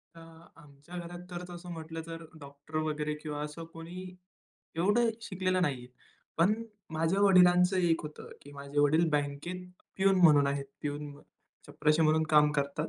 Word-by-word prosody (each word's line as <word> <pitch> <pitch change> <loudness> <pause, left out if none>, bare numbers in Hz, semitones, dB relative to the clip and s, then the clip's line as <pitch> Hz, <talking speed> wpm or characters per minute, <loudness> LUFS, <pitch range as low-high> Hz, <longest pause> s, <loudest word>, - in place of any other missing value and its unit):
अ, - - -12 0.4
आमच्या 150 +3 -14
घरात 175 0 -7
तर 175 0 -5
तसं 175 0 -8
म्हटलं 160 0 -6
तर 165 0 -7 0.2
डॉक्टर 140 +2 -12
वगैरे 150 -1 -2
किंवा 150 -1 -4
असं 150 +2 -7
कोणी 170 +3 -8 0.7
एवढं 205 +8 +3
शिकलेलं 185 -3 0
नाहीये. 135 -7 -1 0.5
पण 180 +5 +5 0.4
माझ्या 165 +5 0
वडिलांचं 180 -1 +5
एक 170 -3 +2
होतं 150 0 -9
की 145 - -13
माझे 140 +1 -6
वडील 155 +3 +4
बँकेत 150 +5 -2 0.3
प्यून 195 0 +3
म्हणून 150 -4 +6
आहेत. 140 0 -1 0.2
प्यून 145 0 -4 0.5
चपराशी 155 +2 +2
म्हणून 155 +1 +3
काम 150 -1 +6
करतात. 140 +2 -1
160 Hz, 150 wpm, -30 LUFS, 145-180 Hz, 0.7 s, म्हणून